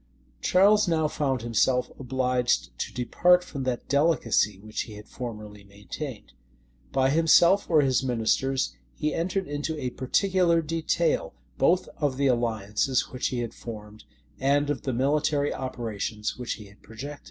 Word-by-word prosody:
Charles 205 +3 +4
now 160 -2 +2
found 135 -5 -1
himself 125 +2 +1
obliged 125 - 0
to - - -3
depart 175 +8 +3
from 140 -6 -6
that 125 -2 -2
delicacy 140 - +2
which 110 +1 -5
he 105 - -9
had 105 0 -11
formerly 105 -4 -8
maintained. 105 - -8 0.6
By 135 0 +2
himself 165 +5 +5
or 160 -3 +5
his 130 -3 +2
ministers 130 +2 0 0.2
he 150 -1 -1
entered 185 +3 -1
into 145 +2 -3
a 125 -3 -3
particular 170 +5 +2
detail, 475 - 0 0.2
both 185 - +3
of 145 -4 -1
the 140 - +1
alliances 120 0 0
which 125 - -2
he 125 -2 -2
had 115 - -5
formed, 105 -2 -10 0.3
and 145 +2 +2
of 135 -5 -3
the 130 - -2
military 145 +3 +1
operations 110 -4 -4
which 125 -1 -4
he 105 - -10
had 100 +1 -18
projected. 140 +6 -8
130 Hz, 150 wpm, -26 LUFS, 115-155 Hz, 0.6 s, himself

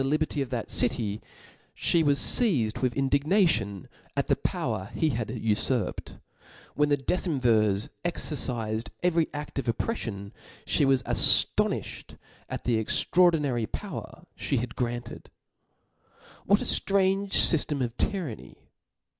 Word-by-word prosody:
liberty 150 +1 -1
of 135 - -3
that 120 -3 -4
city, 110 -4 +1 0.5
flic 170 -2 +1
was 140 -1 +3
feizedwith 130 - +3
indignation 140 - +1 0.3
at - - +1
the - - +4
power 95 +2 -3
he 160 -2 +1
bad 115 -2 -3
ufurped, 110 0 -2 0.5
when 150 0 +1
the 145 - +2
decemvirs 125 - 0 0.2
«ercifed 120 -10 -2
every 170 -2 +2
aft 145 -1 -6
of 135 - -5
oppreffion, 115 - -3 0.3
fhe 145 - +2
was 135 -1 +2
aftonifhed - - +3 0.3
at - - -6
the 115 -3 0
extraordi 175 +7 +2
nary 120 -6 -2
power - - -8
ffie - - -2
had 115 -1 -6
granted. 120 -1 -5 1.2
What 200 +1 +4
a - - -5
ftrange 195 0 +1
fyftem 150 -4 +4
of 120 -1 -4
tyranny 170 - -5
135 Hz, 120 wpm, -26 LUFS, 115-160 Hz, 1.2 s, the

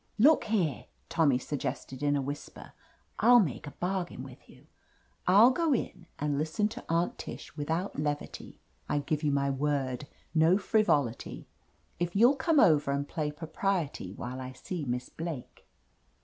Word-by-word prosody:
"Look 285 +8 +5
here," 180 - 0 0.2
Tommy 150 -6 +3
suggested 130 -1 -4
in 145 0 +2
a 140 - 0
whis 145 +2 -5
per, - - -13 0.5
"I'll 240 +2 +7
make 155 - -1
a 145 - -10
bargain 180 -6 -2
with 130 -2 -13
you. - - -17 0.6
I'll 210 +7 +7
go 320 +2 +1
in 175 -6 -5
and 145 -1 -1
listen 160 +7 0
to - - -8
Aunt 170 +1 0
Tish - - -8
without 160 +4 -2
levity 145 -1 -4
— - - -36
^I 145 -1 0
give 150 -1 -1
you 150 -2 +1
my 140 0 +1
word, 135 -1 -1 0.3
no 165 +3 +5
frivolity 190 - 0 0.3
— - - -38
if 175 +1 -2
you'll 240 +7 +6
come 300 +3 +2
over 155 - +5
and 140 +1 -1
play 155 -3 -2
propriety 160 - -2
while 125 +5 -6
I 130 0 -6
see 160 +4 -5
Miss 125 0 -2
Blake." 160 -6 -7
150 Hz, 165 wpm, -30 LUFS, 140-190 Hz, 0.6 s, I'll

